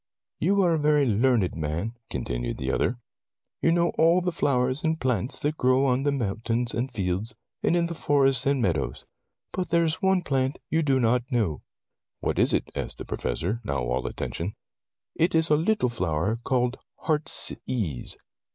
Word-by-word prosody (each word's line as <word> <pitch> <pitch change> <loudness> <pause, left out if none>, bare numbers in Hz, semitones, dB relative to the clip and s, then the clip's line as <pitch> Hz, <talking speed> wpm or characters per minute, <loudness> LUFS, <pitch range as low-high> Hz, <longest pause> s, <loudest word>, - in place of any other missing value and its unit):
"You 195 +4 +3
are 175 -2 +3
a 160 - +1
very 150 -1 +3
learned 115 -3 +2
man," 80 +8 -2 0.2
con 65 - -2
tinued - - -3
the - - -2
other. 120 - 0 0.6
"You 165 - +4
know 170 0 +3
all 165 +3 +5
the 180 0 -1
flowers 130 -3 +1
and 160 0 +1
plants 125 -2 -1
that 150 +2 -1
grow 130 +2 +3
on 130 0 +2
the 145 +1 +1
moun 115 -7 -1
tains 115 +1 -1
and 125 +3 -2
fields, 95 +4 -1 0.3
in 170 0 +2
the 170 - -3
forests 135 -5 +2
and 140 -1 +2
meadows. 75 - -1 0.5
But 180 -2 -2
there 170 0 +3
is 160 -1 -1
one 190 -1 +3
plant 135 -3 0
you 160 - +3
do 135 -4 +2
not 125 +1 +1
know." 105 - 0 0.6
"What - - -1
is - - +4
it?" - - 0
asked - - -4
the - - -7
Professor, 95 - -2
now 70 -9 -2
all - - -1
attention. 95 +7 -4 0.6
"It 170 +2 +1
is 160 -1 +3
a - - +7
little 170 -1 +2
flower 90 -2 0
called 125 -1 0 0.2
heartsease." 125 - -2
130 Hz, 180 wpm, -26 LUFS, 110-155 Hz, 0.6 s, a